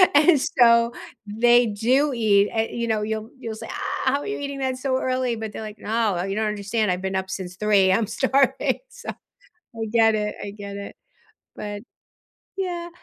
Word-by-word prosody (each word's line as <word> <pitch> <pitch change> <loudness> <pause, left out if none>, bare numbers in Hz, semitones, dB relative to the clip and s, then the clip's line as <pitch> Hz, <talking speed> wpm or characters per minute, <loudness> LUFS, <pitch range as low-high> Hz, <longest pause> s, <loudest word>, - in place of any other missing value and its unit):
and 295 0 +6
so 235 -2 +4 0.3
they 240 +3 +4
do 255 +7 +2
eat 205 -3 +3
uh, 220 - +3
you 235 0 -2
know, 220 -2 0
you'll 220 +1 -3
you'll 230 -4 -6
say, - - -8
"Ah, - - -4
how 280 - +1
are - - -7
you 415 - -3
eating 280 -1 -5
that 260 -1 -1
so 260 0 0
early?" 255 -2 0
but 220 -1 -5
they're 220 - -7
like, 215 0 -8
"No, 215 -5 0
you 195 +1 -3
don't 215 0 0
understand, 210 0 -1
I've 180 - -2
been 190 0 -3
up 190 0 -3
since 185 -1 -6
3, 200 -3 +4
I'm 210 +2 +2
starving," 265 +3 +1
so, - - -10 0.4
I 230 -10 -8
get 225 -1 +5
it, 210 -1 -2
I 200 - -5
get 200 -1 -8
it, 200 0 -7 0.6
but 205 -1 -6 0.8
yeah. 350 -3 -3
225 Hz, 195 wpm, -23 LUFS, 205-260 Hz, 0.8 s, and